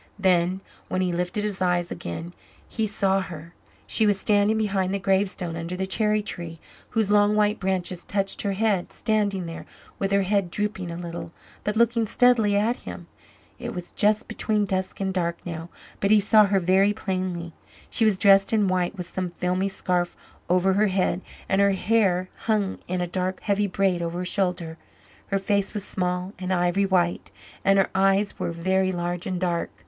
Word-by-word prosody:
Then, 185 -1 +2 0.3
when 185 - -1
he 180 -1 +1
lifted 180 +4 -1
his 205 -3 -3
eyes 175 -1 +1
again, 165 - -6 0.3
he 220 -1 -1
saw 195 -1 +1
her! 170 -2 -9 0.3
She 220 - +2
was 205 -2 +2
standing 210 +1 +3
behind 195 -3 0
the 200 - 0
gravestone, 190 -3 0
under 170 +2 -4
the 190 - -1
cherry 210 +2 +1
tree, 170 -5 -6 0.3
whose 220 -3 0
long 205 0 +4
white 210 0 +2
branches 185 -2 -2
touched 195 -1 -1
her 200 -1 -1
head; 200 -3 0
standing 205 -4 0
there, 165 0 -8 0.3
with 195 0 -1
her 200 0 +3
head 195 -1 +1
drooping 205 -1 -2
a 170 - -5
little, 170 -1 -6 0.3
but 210 - -1
looking 230 0 +2
steadily 225 -3 +4
at 225 +4 +1
him. - - -9 0.5
It - - -5
was 180 -1 -7
just 215 +3 +2
between 210 -2 0
dusk 190 -1 -3
and 190 -1 -1
dark 170 -2 -1
now, 165 -1 -6 0.3
but 200 - +1
he 215 0 +6
saw 210 +1 +5
her 195 0 +2
very 190 +3 +3
plainly. 185 -4 -3 0.3
She 230 - 0
was 215 -3 +3
dressed 195 0 +5
in 215 -3 +3
white, 185 +1 0
with 180 - -4
some 185 0 -3
filmy 180 +2 -1
scarf 180 -2 -1 0.3
over 185 +2 +3
her 210 +2 +3
head, 185 -1 0 0.3
and 195 - +2
her 200 0 +4
hair 190 -3 +2 0.2
hung 210 -3 +1
in 180 0 -1
a - - +1
dark 185 +1 -2
heavy 205 0 +1
braid 190 -2 +1
over 170 0 -3
her 180 - -3
shoulder. 180 -4 -1 0.5
Her 195 - 0
face 200 +1 0
was 205 - -2
small 180 0 -2
and 185 0 -3
ivory 180 +2 +2
white, 175 -2 +1 0.3
and 195 0 +4
her 195 - +2
eyes 195 +1 +2
were - - -1
very 185 +3 +1
large 175 0 -3
and 185 -1 -2
dark. 175 -2 -1
190 Hz, 185 wpm, -25 LUFS, 180-205 Hz, 0.5 s, he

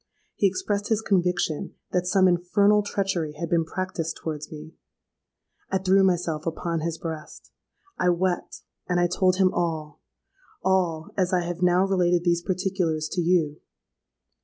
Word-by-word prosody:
He 200 - +3
expressed 200 +2 -2
his 220 -2 +2
conviction 180 -6 0 0.2
that 180 0 0
some 190 0 +4
infernal 200 +4 +3
treachery 190 -6 -2
had 165 +2 -5
been 170 -1 +3
practised 165 -1 -4
towards 155 -2 -5
me. 155 +1 -9 1.0
I 190 - +1
threw 190 +1 +3
myself 170 -4 0
upon 165 0 -2
his 165 +1 -3
breast: 160 -2 -8 0.5
I 180 - +3
wept—and 180 0 -2
I 175 - +4
told 180 +1 +2
him 185 -1 +3
all,—all, 160 - -3
as 185 -2 +1
I 180 - +3
have 175 0 -4
now 180 +1 +4
related 180 -3 +2
these 170 -1 +2
particulars 180 -4 -1
to 180 - -1
you. 165 -4 +1
175 Hz, 140 wpm, -25 LUFS, 165-185 Hz, 1.0 s, some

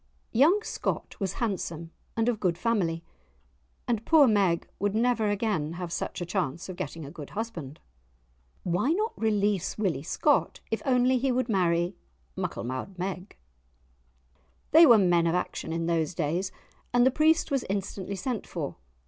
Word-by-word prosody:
Young 325 - +4
Scott - - -3
was 195 -3 -1
handsome 170 -7 -3 0.3
and 225 0 +2
of 235 -3 +1
good 175 -3 0
family, 175 -7 0 0.8
and 230 -3 0
poor 315 0 +6
Meg 195 -6 +2
would 205 +1 0
never 230 -2 +2
again 205 -7 -1
have 175 -1 -5
such - - -3
a - - -2
chance 175 -3 -2
of 185 - -6
getting 160 0 -5
a 140 - -9
good 150 -4 -9
husband. 170 -11 -5 0.8
Why 180 - +1
not 430 +5 -1
release 205 -4 0
Willie 185 -10 0
Scott, 285 - +1
if 225 - -1
only 255 0 +3
he 265 +1 +1
would 255 0 0
marry 175 -2 +1 0.4
Mucklemou'd 130 +10 -4
Meg? 185 +1 -5 1.3
They 325 +1 +9
were 235 -3 +8
men 175 -4 +3
of 165 - +1
action 180 -2 -3
in 165 0 -1
those 165 0 0
days, 175 +4 -1 0.4
and 245 0 +4
the 260 - +5
priest 315 +3 +3
was 275 -2 +1
instantly 195 0 -3
sent 225 +3 -3
for. 155 -5 -5
195 Hz, 155 wpm, -28 LUFS, 170-235 Hz, 1.3 s, They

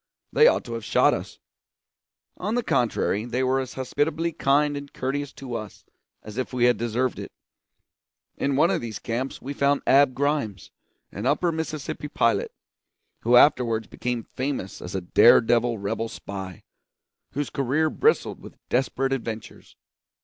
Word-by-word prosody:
They 460 - +7
ought - - +3
to 120 - -7
have 115 -1 -5
shot - - +3
us; - - -5 1.0
on 210 +5 -3
the 245 - 0
contrary, 110 - 0
they 125 +2 -2
were 130 +1 +2
as 130 -1 -5
hospitably 150 +5 -1
kind 145 0 +2
and 140 0 -7
courteous 140 +2 -3
to 130 -3 -8
us 110 -3 -7 0.4
as 105 +3 -7
if 130 - -3
we 125 -2 0
had 120 -2 +4
deserved 120 +2 -1
it. - - -7 1.0
In 140 0 -1
one 160 +6 +4
of 170 - 0
these 110 -3 -5
camps 120 +3 -4
we 140 - -4
found 140 0 +1
Ab 135 -1 +5
Grimes, 140 - -1 0.4
an 105 +5 -4
Upper 160 +5 +2
Mississippi 155 -2 -4
pilot, 115 -7 +1 0.7
who 120 +2 +3
afterwards 120 -4 +4
became 120 0 -4
famous 130 -8 -4
as 90 +2 -6
a 95 - -1
dare 90 +6 +6
devil 120 0 +1
rebel 110 +3 -3
spy, 95 -4 -8 0.7
whose 145 +1 -3
career 140 +4 +1
bristled 455 +4 +1
with - - -12
desperate 135 +1 0
adventures. 115 -4 -6
130 Hz, 155 wpm, -25 LUFS, 115-145 Hz, 1.0 s, They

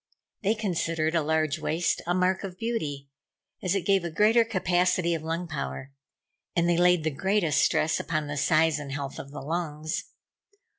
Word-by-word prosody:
They 215 +1 +2
considered 165 -6 -1
a 165 - +2
large 155 0 0
waist 160 +2 0
a 175 - +1
mark 185 +1 +1
of 185 -2 -6
beauty, 150 -13 -3 0.5
as 185 +1 0
it 190 -4 -1
gave 195 -2 +3
a 170 - -2
greater 215 +8 +4
capacity 180 -4 +1
of 165 - -2
lung 165 +2 -3
power; 140 -3 -5 0.6
and 170 -1 +2
they 175 - +3
laid 180 -2 +4
the 155 - 0
greatest 165 -1 +1
stress 155 - +2
upon 155 -2 -2
the 145 0 -4
size 155 +2 +3
and 140 -2 -7
health 140 -1 -5
of 140 - -8
the 145 - -8
lungs. 155 0 -3
165 Hz, 180 wpm, -27 LUFS, 155-185 Hz, 0.6 s, greater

